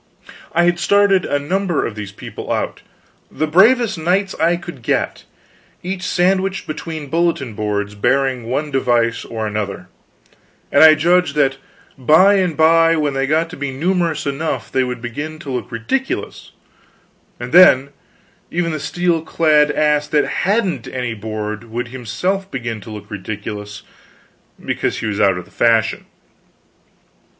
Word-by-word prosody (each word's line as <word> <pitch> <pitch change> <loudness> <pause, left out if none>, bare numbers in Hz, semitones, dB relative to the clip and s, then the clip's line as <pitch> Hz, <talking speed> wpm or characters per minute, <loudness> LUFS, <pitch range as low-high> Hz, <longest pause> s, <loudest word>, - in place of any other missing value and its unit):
I 175 - +3
had 175 0 +2
started 200 -1 +3
a 145 - 0
number 175 +3 -1
of 115 - -4
these 105 -2 -7
people - - -8
out - - -2 0.5
the 155 - -2
bravest 215 +6 +4
knights 190 +4 0
I 170 +2 +3
could 175 -7 -10
get - - -2 0.6
each 185 +1 -4
sandwiched 190 +1 0
between 155 0 -6
bulletin 165 -8 0
boards 105 -1 -2
bearing 130 +3 0
one 145 +4 -2
device 120 -3 +1
or 110 -1 -5
another, 105 -2 -4 0.8
and 140 - +6
I 155 -1 +9
judged 170 0 +2
that 135 -2 +2 0.4
by 160 +10 +5
and 180 -5 0
by 165 +1 +5
when 150 -3 0
they 135 0 -1
got 160 +3 +1
to - - -7
be 140 0 -3
numerous 170 +4 -1
enough 145 +3 -3
they 130 - +2
would 125 -1 -5
begin 145 +6 -5
to 150 -4 -8
look 125 - -4
ridiculous; 120 - -3 0.9
and - - -6
then, 140 -7 +7 0.6
even 170 0 -1
the 155 - -3
steel 175 +2 0
clad 155 -2 +3
ass 150 0 +1
that 150 0 +2
hadn't 190 - -1
any 125 -3 -3
board 110 0 -5
would 120 +1 -5
himself 180 - -3
begin 120 - -5
to 110 - -11
look 105 -1 -9
ridiculous 105 +1 -6 0.8
because - - -1
he - - -4
was 105 -1 -2
out 95 -3 +3
of 90 - -7
the - - -22
fashion. 115 -1 +1
150 Hz, 150 wpm, -18 LUFS, 115-175 Hz, 0.9 s, I